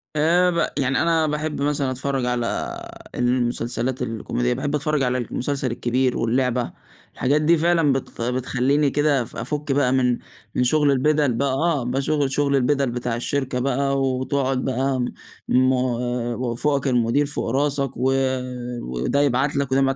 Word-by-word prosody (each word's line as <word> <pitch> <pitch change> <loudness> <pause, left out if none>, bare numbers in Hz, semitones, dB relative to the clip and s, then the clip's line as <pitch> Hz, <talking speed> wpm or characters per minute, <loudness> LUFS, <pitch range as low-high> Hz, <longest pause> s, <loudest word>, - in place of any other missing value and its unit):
آآ 170 +4 +3
ب 170 0 0
يعني 135 -1 +1
أنا 165 -2 +2
باحب 150 -1 -2
مثلًا 140 -2 0
أتفرج 130 0 -2
على 125 -1 -2 0.4
المسلسلات 125 0 -1
الكوميدية، 105 - -1
باحب 145 +1 -2
أتفرج 150 -1 0
على 125 0 +1
المسلسل 130 +1 -2
الكبير 125 +2 0
واللعبة، 125 +1 0 0.4
الحاجات 145 +4 +1
دي 165 +2 +4
فعلًا 165 -3 +3
بت 130 -3 -5
بتخلّيني 130 +4 +1
كده 145 -1 +2
اف 120 - -8
أفُك 150 -1 -3
بقى 135 -2 +2
من 125 -2 +2 0.4
من 125 - +2
شغل 145 +2 +3
البِدَل 145 -1 +2
بقى 135 +3 0
آه، 150 -2 +1
بشغ 140 +3 0
شغل 140 +1 +1
البِدَل 135 -1 +1
بتاع 120 -1 -2
الشركة 130 +1 -2
بقى 135 +1 0
وتقعد 130 0 0
بقى 130 0 0 0.5
م 130 +1 +4 0.7
وفوقك 135 +3 0
المدير 125 +3 +2
فوق 145 -4 -3
راسك 140 +1 0
و 130 +2 +1 0.7
وده 65 - -1
يبعت 140 +1 +1
لك 140 -2 -1
وده 135 +1 +3
ما 135 0 +2
135 Hz, 150 wpm, -22 LUFS, 125-145 Hz, 0.7 s, دي